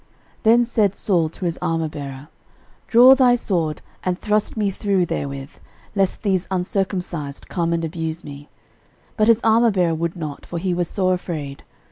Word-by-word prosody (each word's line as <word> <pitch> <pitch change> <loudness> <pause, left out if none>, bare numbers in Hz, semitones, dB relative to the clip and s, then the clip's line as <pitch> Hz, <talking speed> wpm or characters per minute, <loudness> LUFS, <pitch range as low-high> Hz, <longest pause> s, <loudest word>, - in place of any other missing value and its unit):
13:010:004 - - -36 0.3
Then 235 +2 +5
said 215 -5 +1
Saul 170 -6 +1
to 180 - -7
his 170 -1 -1
armourbearer, 150 -4 -3 0.6
Draw 245 +3 +8
thy 255 -2 +5
sword, 170 -10 -1 0.2
and 180 -1 -1
thrust 210 +2 -1
me 205 -2 +1
through 195 -2 0
therewith; 140 -2 -5 0.4
lest 195 +1 0
these 190 -3 0
uncircumcised 180 -5 -3
come 170 -2 -1
and 165 -1 0
abuse 160 0 -4
me. 145 0 -10 0.7
But 215 - +2
his 230 0 +5
armourbearer 220 -7 +3
would 170 +2 -2
not; 155 -5 -6
for 175 - -6
he 180 +1 -1
was 175 -1 -1
sore 185 0 +1
afraid. 155 -6 -5
180 Hz, 160 wpm, -21 LUFS, 160-205 Hz, 0.7 s, Draw